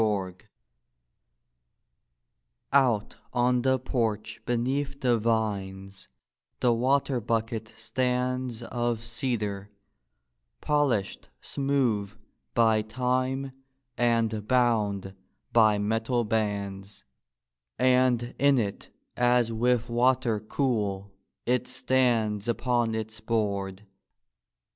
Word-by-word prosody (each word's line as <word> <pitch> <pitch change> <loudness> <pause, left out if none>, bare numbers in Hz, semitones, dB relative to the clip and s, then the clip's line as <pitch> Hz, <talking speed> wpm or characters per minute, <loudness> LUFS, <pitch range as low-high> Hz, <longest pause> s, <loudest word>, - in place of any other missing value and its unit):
I 100 -4 0 2.4
I 130 -5 +5
3 - - -20 0.3
ON 125 0 +2
the 130 +1 +2
porch 115 -4 -2
beneath 135 +4 -1
the 120 -3 +2
vines 100 -4 -2 0.5
the 120 -1 +3
water 130 +2 +1
bucket 115 0 -2
stands 125 0 -1
Of 120 -1 -2
cedar, 110 -5 -3 0.9
polished 140 -10 0
smooth 125 -8 0 0.4
by 110 -2 +4
time 130 +4 -1 0.4
and 115 -3 +1
bound 105 -6 +1 0.4
by 110 -3 +5
metal 115 +4 0
bands; 100 -2 -3 0.7
And 125 -2 +3
in 140 0 +4
it, 100 -4 -3 0.3
as 120 -1 +2
with 120 +1 +2
wa¬ 125 +2 +3
ter 115 -4 -1
cool 105 -4 -1 0.3
it 125 0 +1
stands 120 -5 +1
upon 120 0 0
its 110 0 -5
board. 100 -3 -2
115 Hz, 90 wpm, -27 LUFS, 105-125 Hz, 2.4 s, I